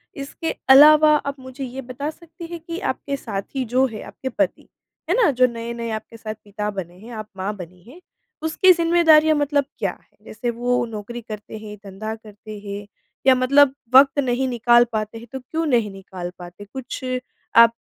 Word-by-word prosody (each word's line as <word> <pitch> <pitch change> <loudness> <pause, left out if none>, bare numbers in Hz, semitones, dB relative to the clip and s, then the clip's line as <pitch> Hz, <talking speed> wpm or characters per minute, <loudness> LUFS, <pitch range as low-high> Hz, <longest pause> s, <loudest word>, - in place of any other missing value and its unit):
इसके 280 +3 -4 0.2
अलावा 305 +3 +8
आप 280 -1 -2
मुझे 260 +1 -8
ये 260 +1 -6
बता 260 +4 -5
सकती 335 +2 -11
हैं 340 - -5
कि 335 +1 -4
आपके 280 - -3
साथी 225 +3 -4
जो 260 +2 +4
है, 215 -3 -8
आपके 265 - -6
पति - - -2 0.4
है 360 - +3
ना, 460 -8 +4
जो 255 0 +4
नए-नए 235 0 -5
आपके 220 +1 -6
साथ 215 -1 -5
पिता 210 0 -4
बने 180 -3 -7
हैं, 230 +4 -12
आप 215 -2 -6
माँ 200 +3 -3
बनी 180 -1 -11
हैं, 310 +8 -13 0.4
उसकी 320 +4 +4
ज़िम्मेदारियाँ 330 -2 +5
मतलब 290 -1 +1
क्या - - 0
हैं? - - -35
जैसे 235 +3 -4
वो 245 +1 0
नौकरी 225 +2 -7
करते 215 -1 -8
हैं, 215 -1 -9
धंधा 205 +3 -5
करते 215 -1 -11
हैं 200 +1 -5 0.4
या 260 - +8
मतलब 270 +2 +4 0.2
वक़्त 275 +1 +7
नहीं 260 -1 +1
निकाल 240 -1 +5
पाते 215 +1 -3
हैं 230 +1 -11
तो 265 - -4
क्यों 320 +6 -3
नहीं 235 -8 +1
निकाल 185 -2 -8
पाते? 175 +3 -10
कुछ 265 -1 -6 0.5
आप 230 0 +8
245 Hz, 185 wpm, -22 LUFS, 215-280 Hz, 0.5 s, अलावा